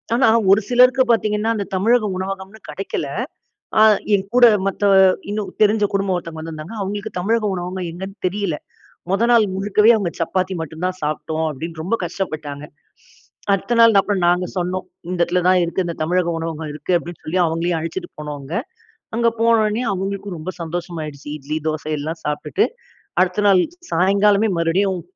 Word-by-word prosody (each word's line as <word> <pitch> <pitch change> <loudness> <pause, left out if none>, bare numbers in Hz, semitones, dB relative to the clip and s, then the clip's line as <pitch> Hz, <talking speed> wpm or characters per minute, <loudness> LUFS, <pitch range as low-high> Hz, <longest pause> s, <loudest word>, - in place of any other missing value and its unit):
ஆனா 245 -1 +4 0.3
ஒரு 210 - +3
சிலருக்கு 250 +1 +5
பார்த்தீங்கன்னா, 215 -1 +1
அந்த 200 - -2
தமிழக 220 +4 +3
உணவகம்னு 195 +2 -6
கிடைக்கல. 150 -1 -4 0.7
அ - - +8 0.3
என் 195 0 -5
கூட 250 - +7 0.2
மத்த 195 +1 -3 0.5
இன்னும் 205 -2 -3
தெரிஞ்ச 210 0 +2
குடும்பம் 195 -2 +1
ஒருத்தவங்க 165 -2 -6
வந்துருந்தாங்க. 160 +6 -7
அவங்களுக்கு 200 +1 -4
தமிழக 220 +3 +1
உணவகம் 180 0 -4
எங்கேன்னு 190 +4 -8
தெரியல. 190 -5 -2 0.5
முதல் 230 +5 +2
நாள் 230 -2 +6
முழுக்கவே 210 +3 +3
"அவங்க 195 -5 -1
சப்பாத்தி 185 +3 -1
மட்டும் 160 +2 -6
தான் 185 0 -3
சாப்பிட்டோம்." 155 +1 -2
அப்படின்னு 160 +3 -7
ரொம்ப 185 +7 -1
கஷ்டப்பட்டாங்க. 155 -5 -5 0.9
அடுத்த 195 +5 0
நாள், 230 -1 +7
அப்புறம் 195 -1 -1
நாங்க 180 +1 +2
சொன்னோம் 180 +1 -2 0.3
"இந்த 180 - -3
இடத்துல 180 +1 0
தான் 185 0 +5
இருக்கு, 170 +3 -1
இந்த 170 - -3
தமிழக 175 +2 +1
உணவகம் 160 -1 -4
இருக்கு" 150 +5 -4
அப்படின்னு 170 -1 -10
சொல்லி 170 +4 -1
அவங்களையும் 165 +1 -1
அழைச்சிட்டு 350 - -5
போனோங்க. 145 -1 -7 0.6
அங்கே 235 0 +3
போன 230 0 +4
உடனே 215 +3 0
அவங்களுக்கும் 195 0 -4
ரொம்ப 155 +4 -5
சந்தோஷமாயிடுச்சு. 160 -4 -6
இட்லி 150 +1 -5
தோச 155 -1 -2
எல்லாம் 160 +3 -5
சாப்ட்டுட்டு, 150 0 0 0.6
அடுத்த 185 +3 0
நாள் 190 -2 +5 0.3
சாயங்காலமே 200 +4 +3
மறுபடியும் 180 +3 +1
185 Hz, 155 wpm, -20 LUFS, 165-205 Hz, 0.9 s, அ